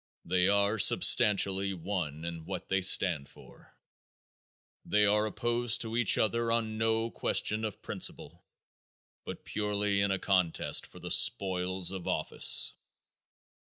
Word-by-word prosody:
They 90 +1 +1
are 100 +2 +1
substantially 100 0 +3
one 85 -4 -6
in 85 -1 -8
what 95 -2 -7
they 95 0 0
stand 90 -6 +2
for. - - -19 1.1
They 105 0 +1
are 105 +1 +1
opposed 120 +2 -1
to 115 0 -4
each 120 -4 +3
other 115 +1 -1
on 110 -2 -3
no 115 +1 -1
question 110 +1 -1
of 110 -3 -7
principle - - -7 0.8
but - - -10
purely 105 -1 -2
in 100 - 0
a 95 - -1
contest 90 -4 -1
for - - -17
the - - -8
spoils 95 -1 +2
of 95 -2 -8
office. - - +3
100 Hz, 130 wpm, -29 LUFS, 95-110 Hz, 1.1 s, substantially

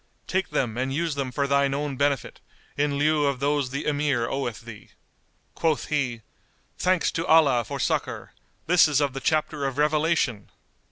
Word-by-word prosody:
Take 190 -1 -1
them 120 -2 -1
and 130 +1 -1
use 165 +3 -1
them 135 -2 -3
for 140 +3 -1
thine 140 0 +2
own 145 -1 -3
benefit, 140 +1 -1 0.4
in 145 0 0
lieu 150 0 +2
of 140 -2 -1
those 140 -1 0
the 140 +3 -4
Emir 145 -5 0
oweth 120 -5 -3
thee." 115 -3 -12 0.6
Quoth 160 -3 -1
he, 130 -6 -1 0.5
"Thanks 185 -1 +1
to 165 - -3
Allah 145 -7 +5
for - - -6
succour! - - -2 0.3
This 175 0 +5
is 145 -2 +2
of 140 -3 0
the 135 - -4
chapter 155 -1 0
of 135 0 -5
revelation!" 150 -7 +1
140 Hz, 170 wpm, -25 LUFS, 130-150 Hz, 0.6 s, Allah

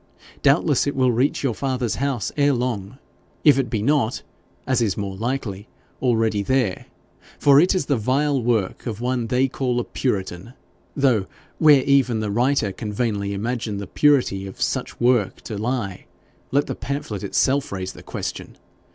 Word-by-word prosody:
Doubtless - - +3
it 145 - -1
will 130 -1 +3
reach 125 +6 +1
your 130 -4 +1
father's 130 -2 -2
house 135 -5 -1
ere 145 -1 +3
long, 120 -3 -3 0.5
if 145 -3 +6
it 130 -3 -1
be 110 -4 -1
not, 135 -3 +1 0.4
as 130 -2 +1
is 105 -5 0
more 100 -2 -4
likely, 110 -3 -3 0.3
already 115 -4 +1
there, 120 -3 0 0.5
for 140 -1 +6
it 180 +4 +4
is 185 - 0
the 140 - +1
vile 135 +4 +1
work 115 -2 -1
of 110 -2 -4
one 125 -1 -1
they 125 +3 +2
call 125 -2 -1
a - - -1
puritan, 95 -3 -3 0.4
though 125 -9 +2 0.3
where 150 -4 +6
even 135 -5 +3
the 105 -1 -2
writer 120 -1 +1
can 105 +3 -6
vainly 105 -2 -1
imagine 110 +1 -3
the 100 - -5
purity 120 -6 +2
of 95 - -11
such - - -2
work 120 -4 +2
to 110 - -6
lie, 105 -3 -3 0.4
let 140 +3 +2
the - - -4
pamphlet 115 -5 -4
itself 135 +7 +1
raise 95 -1 -4
the - - -12
question. - - -6
120 Hz, 170 wpm, -22 LUFS, 105-135 Hz, 0.5 s, if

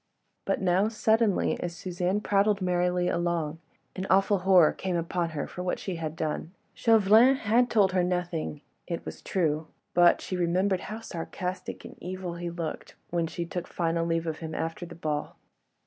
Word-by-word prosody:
But - - 0
now, 190 +2 +3
suddenly, 220 -1 +2
as 175 -1 -4
Suzanne 180 +3 -1
prattled 205 0 +2
merrily 180 -1 +1
along, 170 -3 -1 0.4
an 190 0 -4
awful 195 +1 +4
horror 180 -3 +6
came 185 -2 -3
upon 170 0 -1
her 145 - -1
for 180 - -7
what 180 0 -1
she 185 -3 -4
had 160 -1 -4
done. 160 +2 -3 0.2
Chauvelin 225 +3 +5
had 240 0 +2
told 200 -4 +4
her 185 -1 +2
nothing, 175 -4 -2 0.3
it 170 - -4
was - - -7
true; 155 -4 0 0.3
but 175 0 +6
she 185 - -4
remembered 180 +2 +1
how 220 +2 -5
sarcastic 180 -1 -5
and - - -11
evil 180 0 -5
he 170 0 -4
looked 170 -2 -5 0.2
when 170 -1 0
she 170 +1 -4
took 175 +1 -5
final 165 -1 0
leave 165 0 0
of 160 -1 -3
him 160 -1 -5
after 165 +2 -3
the - - -10
ball. 150 -3 -3
180 Hz, 175 wpm, -28 LUFS, 170-190 Hz, 0.4 s, horror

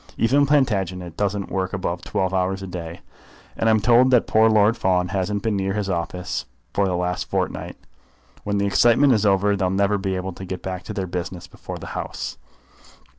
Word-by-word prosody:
Even 140 +5 +3
Plantagenet 95 - 0
doesn't 100 -1 -2
work 95 0 -2
above 90 -3 -2
twelve 95 0 -2
hours 95 +1 0
a - - -4
day, 85 -2 -7 0.5
and 115 - +1
I'm 110 -1 +4
told 120 +4 +5
that 125 -3 +4
poor 110 +1 +4
Lord 110 +1 +4
Fawn 90 -4 +1
hasn't 100 +1 -2
been 110 -2 0
near 95 0 -1
his 100 -2 -2
office 90 +1 -3 0.3
for 100 -1 +2
the 90 - 0
last 90 0 -2
fortnight. - - -3 0.7
When 100 0 -1
the 100 - +1
excitement 120 +7 +4
is 105 -2 +2
over 100 +1 +3
they'll 95 -2 0
never 100 +2 +1
be 95 -1 -2
able 95 0 -4
to 95 - -9
get 90 -1 -6
back 95 -1 -4
to 110 - -5
their 95 -3 -2
business 90 0 -5
before - - -9
the - - -8
grouse. - - -5
95 Hz, 195 wpm, -22 LUFS, 90-105 Hz, 0.7 s, told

